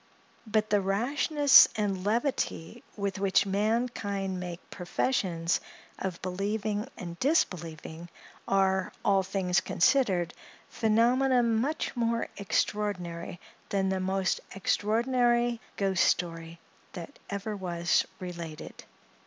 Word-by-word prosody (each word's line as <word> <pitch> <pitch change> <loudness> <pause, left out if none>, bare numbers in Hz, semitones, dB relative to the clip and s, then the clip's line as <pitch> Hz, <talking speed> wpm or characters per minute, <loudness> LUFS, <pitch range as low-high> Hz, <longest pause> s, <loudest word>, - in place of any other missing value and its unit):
But 215 0 0
the 205 -1 +4
rashness 275 +8 +5
and 195 -3 -1
levity 230 - -1
with 200 -1 -2
which 195 0 +3
mankind 200 -2 -1
make 180 -1 -7
professions 175 -3 0 0.4
of 185 -3 -4
believing 205 +4 -2
and 170 -2 -7
disbelieving, 170 - -1 0.4
are, 190 -1 +2
all 195 -1 +4
things 185 -1 0
considered, 185 - +2 0.4
phenomena 245 +3 +3
much 235 +8 0
more 230 -1 0
extraordinary 180 -4 -2 0.3
than 195 -1 0
the 190 0 0
most 190 0 0 0.2
extraordinary 240 +4 +1 0.2
ghost 195 -2 +2
story 165 -1 -1 0.3
that 170 -2 -9
ever 200 +1 -3
was 175 -3 +1 0.2
related. 170 -4 -8
195 Hz, 100 wpm, -29 LUFS, 180-230 Hz, 0.4 s, rashness